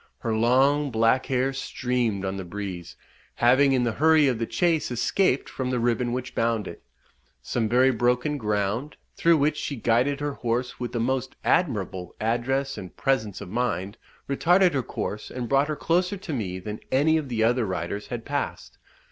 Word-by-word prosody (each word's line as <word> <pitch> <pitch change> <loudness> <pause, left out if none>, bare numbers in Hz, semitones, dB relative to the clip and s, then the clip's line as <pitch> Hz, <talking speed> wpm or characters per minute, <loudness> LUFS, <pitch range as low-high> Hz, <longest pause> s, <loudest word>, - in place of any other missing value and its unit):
Her 115 -1 -2
long 135 +6 +3
black 115 +2 +2
hair 130 +1 0
streamed 125 -6 -1
on 95 0 -3
the 95 - -4
breeze, 90 -2 -6 0.4
having 130 +4 +4
in 130 -2 +2
the 120 - +1
hurry 155 +4 +4
of 125 -4 0
the 115 - -1
chase 165 -3 +1
escaped 130 - +1
from 130 -1 -4
the 125 -1 0
ribbon 120 +1 0
which 125 +1 -4
bound 115 -2 0
it. - - -9 0.6
Some 115 -3 -1
very 130 +3 +4
broken 125 +5 0
ground, 105 +5 -2 0.2
through 170 -1 +4
which 150 +1 +1
she 145 - -3
guided 125 +4 +1
her 145 -1 -2
horse 120 0 -2
with 120 - -4
the 120 - -1
most 130 +2 -1
admirable 100 - 0
address 130 +5 -1
and 95 -2 -10
presence 110 -9 0
of 100 - -8
mind, 100 -3 -2 0.3
retarded 175 +5 +3
her 135 - +1
course, 105 -3 -5
and 125 -1 -5
brought 140 +2 +3
her 155 - -2
closer 180 +6 0
to 185 -4 -6
me 95 -8 -3
than 105 +3 -6
any 150 +4 +3
of 150 -4 -3
the 115 -2 0
other 120 0 +2
riders 95 +3 -4
had 120 -2 -6
passed. 145 0 -4
125 Hz, 180 wpm, -25 LUFS, 110-140 Hz, 0.6 s, having